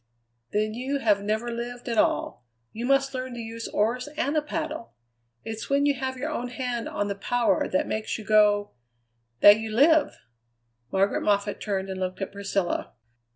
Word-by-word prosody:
"Then 215 Hz, +1 st, 0 dB
you 260 Hz, +4 st, -2 dB
have 210 Hz, -6 st, +2 dB
never 220 Hz, +3 st, -1 dB
lived 240 Hz, +1 st, -6 dB
at 230 Hz, -2 st, +1 dB
all. 120 Hz, -, 0 dB, 0.3 s
You 235 Hz, +2 st, -4 dB
must 275 Hz, 0 st, +2 dB
learn 255 Hz, -1 st, -4 dB
to -, -, -6 dB
use 230 Hz, 0 st, -6 dB
oars 240 Hz, +6 st, 0 dB
and 295 Hz, -1 st, 0 dB
a 305 Hz, -, +3 dB
paddle. 310 Hz, -4 st, -5 dB, 0.5 s
It's 225 Hz, 0 st, -6 dB
when 280 Hz, +1 st, +3 dB
you 290 Hz, -, +4 dB
have 260 Hz, 0 st, -4 dB
your 300 Hz, +5 st, -3 dB
own 250 Hz, -5 st, -3 dB
hand 245 Hz, -2 st, -3 dB
on 205 Hz, -, -2 dB
the 200 Hz, -, -1 dB
power 235 Hz, +4 st, +1 dB
that 185 Hz, -, +1 dB
makes 215 Hz, 0 st, -2 dB
you 220 Hz, -, -9 dB
go 205 Hz, -1 st, +4 dB, 0.7 s
that 205 Hz, +1 st, +9 dB
you 220 Hz, 0 st, -4 dB
live." 290 Hz, +7 st, +4 dB, 0.7 s
Margaret 195 Hz, +1 st, +2 dB
Moffatt 205 Hz, 0 st, 0 dB
turned 195 Hz, -2 st, -2 dB
and 190 Hz, -1 st, -5 dB
looked 185 Hz, 0 st, -3 dB
at 195 Hz, -, -4 dB
Priscilla. 200 Hz, -2 st, -2 dB
230 Hz, 180 wpm, -26 LUFS, 205-260 Hz, 0.7 s, that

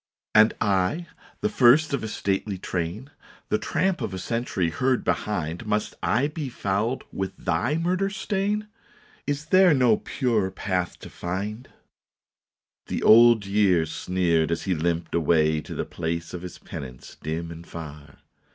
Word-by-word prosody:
" -, -, -70 dB
And 110 Hz, +1 st, +6 dB
I, 100 Hz, -, +1 dB, 0.4 s
the 215 Hz, -, +2 dB
first 145 Hz, -, +5 dB
of 140 Hz, -, -1 dB
a -, -, -2 dB
stately 100 Hz, -1 st, -2 dB
train, 90 Hz, +9 st, -4 dB, 0.4 s
The 105 Hz, -, +1 dB
tramp 175 Hz, -, 0 dB
of 105 Hz, -5 st, -3 dB
a -, -, -4 dB
century 95 Hz, -4 st, -1 dB
heard 130 Hz, +6 st, +1 dB
behind, 90 Hz, -1 st, -2 dB
Must 105 Hz, 0 st, -1 dB
I 125 Hz, +5 st, +2 dB
be 150 Hz, -2 st, -5 dB
fouled 110 Hz, +3 st, -1 dB
with 95 Hz, 0 st, -4 dB
thy 105 Hz, -, 0 dB
murder 180 Hz, +4 st, 0 dB
stain? 205 Hz, +1 st, -1 dB, 0.6 s
Is 145 Hz, +1 st, -2 dB
there 185 Hz, -1 st, +5 dB
no 125 Hz, -5 st, +4 dB
pure 110 Hz, -7 st, 0 dB
path 90 Hz, -1 st, -2 dB
to -, -, -9 dB
find? 105 Hz, +7 st, -4 dB, 0.6 s
" -, -, -69 dB
The -, -, -3 dB
Old 115 Hz, -1 st, +7 dB
Year 100 Hz, -4 st, +3 dB
sneered 85 Hz, -2 st, 0 dB
as 85 Hz, -, -1 dB
he 95 Hz, -, 0 dB
limped 85 Hz, +1 st, -1 dB
away 80 Hz, -2 st, +2 dB
To -, -, -8 dB
the -, -, -2 dB
place 85 Hz, +1 st, -4 dB
of 90 Hz, -, -5 dB
his 90 Hz, -1 st, -8 dB
penance 65 Hz, -3 st, -9 dB
dim 80 Hz, +2 st, -4 dB
and 85 Hz, +1 st, -10 dB
far. 75 Hz, -3 st, -9 dB
100 Hz, 160 wpm, -25 LUFS, 85-130 Hz, 0.6 s, Old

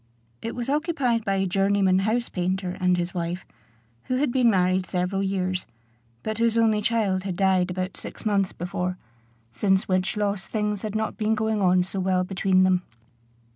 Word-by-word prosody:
It 230 Hz, -, -4 dB
was 240 Hz, 0 st, -4 dB
occupied 280 Hz, -6 st, 0 dB
by 195 Hz, -2 st, 0 dB
a 195 Hz, 0 st, +1 dB
journeyman 195 Hz, 0 st, +2 dB
house 225 Hz, +4 st, 0 dB
painter 185 Hz, 0 st, -2 dB
and 180 Hz, -1 st, +2 dB
his 175 Hz, 0 st, -2 dB
wife, 175 Hz, +1 st, -3 dB, 0.6 s
who 255 Hz, -, -1 dB
had 270 Hz, 0 st, +1 dB
been 245 Hz, -2 st, +4 dB
married 185 Hz, -2 st, +2 dB
several 180 Hz, +1 st, -1 dB
years, 185 Hz, -1 st, -1 dB, 0.6 s
but 220 Hz, 0 st, -3 dB
whose 230 Hz, 0 st, +2 dB
only 220 Hz, -2 st, +3 dB
child 210 Hz, -4 st, +1 dB
had 190 Hz, -2 st, -3 dB
died 190 Hz, -1 st, +2 dB
about 185 Hz, +1 st, -3 dB
six -, -, -8 dB
months 200 Hz, -3 st, +1 dB
before, 180 Hz, +1 st, -3 dB, 0.5 s
since 190 Hz, -, +1 dB
which 185 Hz, +2 st, 0 dB
loss 200 Hz, -2 st, -1 dB
things 210 Hz, -2 st, -1 dB
had 215 Hz, -1 st, -4 dB
not 220 Hz, 0 st, -2 dB
been 220 Hz, 0 st, +1 dB
going 215 Hz, -1 st, 0 dB
on 180 Hz, -1 st, +4 dB
so 190 Hz, +1 st, -4 dB
well 185 Hz, -1 st, +1 dB
between 185 Hz, 0 st, +2 dB
them. 185 Hz, -1 st, +3 dB
195 Hz, 175 wpm, -25 LUFS, 185-215 Hz, 0.6 s, been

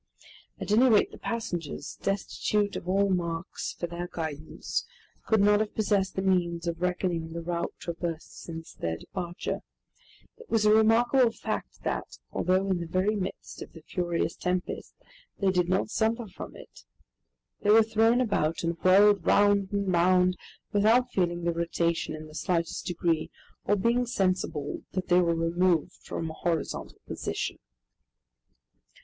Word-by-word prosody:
At -, -, -4 dB
any 245 Hz, +5 st, +6 dB
rate 215 Hz, -3 st, +4 dB
the -, -, -12 dB
passengers, 175 Hz, -10 st, -4 dB
destitute 205 Hz, +1 st, 0 dB
of 175 Hz, -, -5 dB
all 195 Hz, +1 st, +3 dB
marks 170 Hz, -1 st, -2 dB
for -, -, -4 dB
their 175 Hz, +1 st, -5 dB
guidance, 155 Hz, -3 st, -4 dB, 0.4 s
could 220 Hz, -, +4 dB
not 205 Hz, +1 st, +5 dB
have 215 Hz, -1 st, -2 dB
possessed 205 Hz, -3 st, +1 dB
the 190 Hz, -, -1 dB
means 175 Hz, -3 st, +1 dB
of 170 Hz, 0 st, -3 dB
reckoning 175 Hz, -2 st, -1 dB
the 170 Hz, -, -4 dB
route 170 Hz, 0 st, -2 dB
traversed 170 Hz, -1 st, -5 dB
since 165 Hz, -1 st, -8 dB
their 80 Hz, -1 st, -3 dB
departure. 175 Hz, -2 st, -5 dB, 0.8 s
It 470 Hz, 0 st, -15 dB
was 220 Hz, -2 st, +2 dB
a 210 Hz, -, +6 dB
remarkable 235 Hz, +3 st, +5 dB
fact -, -, -5 dB
that, -, -, -3 dB
although 185 Hz, +1 st, +1 dB
in 180 Hz, -, +1 dB
the 170 Hz, -, -4 dB
very 185 Hz, +5 st, +1 dB
midst 190 Hz, -2 st, -5 dB
of -, -, -9 dB
the 165 Hz, -, -13 dB
furious 175 Hz, -1 st, -1 dB
tempest, 180 Hz, 0 st, -3 dB, 0.4 s
they 195 Hz, -2 st, +2 dB
did 180 Hz, -1 st, +1 dB
not 190 Hz, +3 st, +1 dB
suffer 230 Hz, +1 st, 0 dB
from 190 Hz, -, -9 dB
it. -, -, -14 dB, 0.8 s
They 205 Hz, -, 0 dB
were 220 Hz, +1 st, +8 dB
thrown 225 Hz, +3 st, +3 dB
about 165 Hz, -10 st, 0 dB
and 170 Hz, 0 st, -1 dB
whirled 200 Hz, 0 st, +6 dB
round 200 Hz, +1 st, +4 dB
and 200 Hz, -2 st, 0 dB
round 180 Hz, +1 st, +4 dB, 0.4 s
without 230 Hz, +5 st, +4 dB
feeling 175 Hz, -4 st, 0 dB
the 170 Hz, 0 st, +1 dB
rotation 170 Hz, -1 st, -1 dB
in 155 Hz, 0 st, -8 dB
the 155 Hz, -, -13 dB
slightest 170 Hz, 0 st, -1 dB
degree, 165 Hz, -2 st, 0 dB, 0.4 s
or 205 Hz, -, +3 dB
being 235 Hz, +5 st, +1 dB
sensible 185 Hz, -, -1 dB
that 185 Hz, -1 st, -3 dB
they 180 Hz, 0 st, +6 dB
were 170 Hz, -1 st, +2 dB
removed 165 Hz, 0 st, +1 dB
from 165 Hz, -1 st, -4 dB
a -, -, -8 dB
horizontal 165 Hz, -1 st, -3 dB
position. -, -, -4 dB
185 Hz, 155 wpm, -28 LUFS, 170-205 Hz, 0.8 s, were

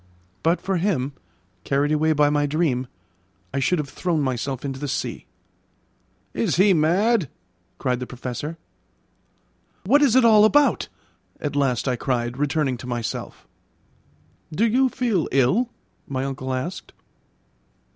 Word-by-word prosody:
But 165 Hz, +2 st, +2 dB
for 195 Hz, -1 st, -1 dB
him, 160 Hz, -7 st, 0 dB, 0.5 s
carried 140 Hz, +5 st, +1 dB
away 155 Hz, +1 st, +2 dB
by 145 Hz, -1 st, +3 dB
my 145 Hz, 0 st, +1 dB
dream, 140 Hz, -5 st, 0 dB, 0.7 s
I 140 Hz, -, 0 dB
should 180 Hz, +6 st, +2 dB
have 150 Hz, -2 st, -2 dB
thrown 160 Hz, +4 st, -1 dB
myself 130 Hz, 0 st, -2 dB
into 135 Hz, -1 st, -4 dB
the 145 Hz, -, -4 dB
sea. -, -, -4 dB, 1.1 s
"Is 115 Hz, -, 0 dB
he 195 Hz, +2 st, +5 dB
mad?" 180 Hz, -, +2 dB, 0.5 s
cried 125 Hz, -2 st, -1 dB
the 125 Hz, -, -5 dB
Professor. 125 Hz, +6 st, -6 dB, 1.3 s
"What 280 Hz, +9 st, +5 dB
is 270 Hz, -5 st, +4 dB
it 260 Hz, -2 st, +6 dB
all 215 Hz, -2 st, +7 dB
about?" 285 Hz, +6 st, +4 dB, 0.5 s
at 145 Hz, -1 st, -3 dB
last 135 Hz, -3 st, +1 dB
I 125 Hz, -2 st, 0 dB
cried, 120 Hz, -1 st, -2 dB
returning 145 Hz, -3 st, 0 dB
to 125 Hz, -, -9 dB
myself. 120 Hz, -2 st, -5 dB, 1.0 s
"Do 195 Hz, +9 st, +1 dB
you 255 Hz, +4 st, +3 dB
feel 235 Hz, -10 st, 0 dB
ill?" 140 Hz, -, +2 dB, 0.4 s
my 135 Hz, -1 st, -2 dB
uncle 130 Hz, -1 st, -4 dB
asked. 130 Hz, +8 st, -4 dB
145 Hz, 135 wpm, -23 LUFS, 130-185 Hz, 1.3 s, all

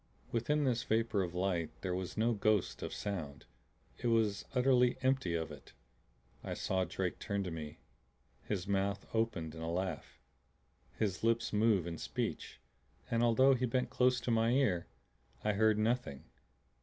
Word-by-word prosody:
Within 145 Hz, +6 st, +1 dB
this 125 Hz, -3 st, +1 dB
vapor 115 Hz, -3 st, +1 dB
of 90 Hz, -1 st, -3 dB
light 90 Hz, -3 st, 0 dB
there 95 Hz, -2 st, -2 dB
was 90 Hz, +2 st, -4 dB
no 115 Hz, +2 st, +3 dB
ghost 105 Hz, -2 st, +1 dB
of -, -, -4 dB
sound; 80 Hz, -10 st, -5 dB, 0.5 s
it -, -, -2 dB
was 110 Hz, -3 st, +2 dB
utterly 125 Hz, -1 st, +4 dB
empty 130 Hz, -10 st, +1 dB
of 80 Hz, -2 st, -2 dB
it. -, -, -12 dB, 0.7 s
I -, -, -4 dB
saw 95 Hz, -1 st, 0 dB
Drake 90 Hz, +1 st, -3 dB
turn 100 Hz, -2 st, -2 dB
to 90 Hz, -, -4 dB
me, 75 Hz, -2 st, -6 dB, 0.7 s
his 95 Hz, -3 st, -3 dB
mouth 100 Hz, 0 st, 0 dB
open 105 Hz, -9 st, -1 dB
in 80 Hz, -, -8 dB
a 80 Hz, -, -3 dB
laugh, 95 Hz, +2 st, -3 dB, 0.8 s
his 100 Hz, -3 st, -1 dB
lips 115 Hz, 0 st, +1 dB
move 105 Hz, -4 st, +3 dB
in 85 Hz, -2 st, -5 dB
speech -, -, -4 dB, 0.5 s
and 115 Hz, 0 st, +2 dB
although 120 Hz, +3 st, +5 dB
he 125 Hz, 0 st, 0 dB
bent 125 Hz, +1 st, 0 dB
close 125 Hz, 0 st, +3 dB
to 120 Hz, -, -1 dB
my 115 Hz, 0 st, +3 dB
ear, 110 Hz, -11 st, +2 dB, 0.6 s
I 105 Hz, -, +2 dB
heard 110 Hz, +1 st, +3 dB
nothing. 110 Hz, -, 0 dB
105 Hz, 160 wpm, -34 LUFS, 90-115 Hz, 0.8 s, although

